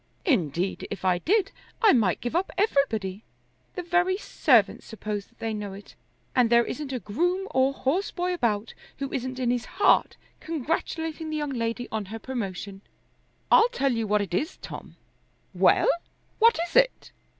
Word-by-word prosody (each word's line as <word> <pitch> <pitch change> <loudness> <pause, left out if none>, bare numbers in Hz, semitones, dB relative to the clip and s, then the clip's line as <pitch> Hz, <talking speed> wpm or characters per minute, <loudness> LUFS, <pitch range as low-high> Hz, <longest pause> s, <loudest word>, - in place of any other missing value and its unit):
Indeed 185 - 0
if 195 -2 -6
I 180 -1 +3
did 395 - +1 0.3
I 445 -4 +6
might 210 -8 +2
give 245 +5 -3
up 365 +3 +1
everybody. 225 - 0 0.5
The 360 - -4
very 355 +2 +2
servants 235 - +2
suppose 210 -2 -5
that 235 - -31
they 225 -1 -3
know 205 -2 -5
it, 200 +1 -12 0.4
and 245 -3 +4
there 235 0 +5
isn't 295 -2 -5
a 260 - -1
groom 355 - -1
or 260 +1 +3
horseboy 355 +6 -1
about 225 -9 -1 0.2
who 275 -1 -4
isn't 255 0 -3
in 250 -2 +1
his 245 -1 -1
heart 405 - +2 0.2
congratulating 320 +1 -3
the 310 - -2
young 295 -2 -2
lady 230 0 -2
on 220 -2 -2
her 220 +4 -7
promotion." 200 -5 -5 0.7
"I'll 455 - +7
tell 275 - 0
you 230 -2 -1
what 210 0 +2
it 185 - -8
is, 305 - -1
Tom." - - -9 0.6
"Well; - - +4 0.5
what 460 +1 +6
is 335 - -14
it?" - - +3
255 Hz, 165 wpm, -26 LUFS, 210-335 Hz, 0.7 s, I'll